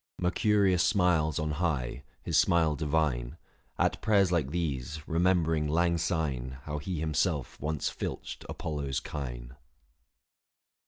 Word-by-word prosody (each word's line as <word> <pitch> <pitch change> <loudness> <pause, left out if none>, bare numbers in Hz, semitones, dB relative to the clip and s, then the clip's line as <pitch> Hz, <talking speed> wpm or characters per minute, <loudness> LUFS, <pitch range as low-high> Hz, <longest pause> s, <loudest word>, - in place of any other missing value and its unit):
169 90 - 0 0.3
Mercurius 95 -4 +4
smiles 90 - +2
on 75 -1 -1
high, 65 -7 -1 0.2
his - - -2
smile 80 -3 +4
divine, 75 -6 0 0.4
790 - - +3
At - - -31
prayers 100 -4 +3
like 80 -6 +1
these, 75 -2 -3
remembering 80 -2 +2
lang 85 +2 +2
syne 70 -7 -1
How 75 -1 -4
he 85 +2 -4
himself 75 -2 -1
once 75 0 -1
filched - - -5
Apollo's 70 -4 -3
kine. - - -6
80 Hz, 125 wpm, -29 LUFS, 70-85 Hz, 0.4 s, Mercurius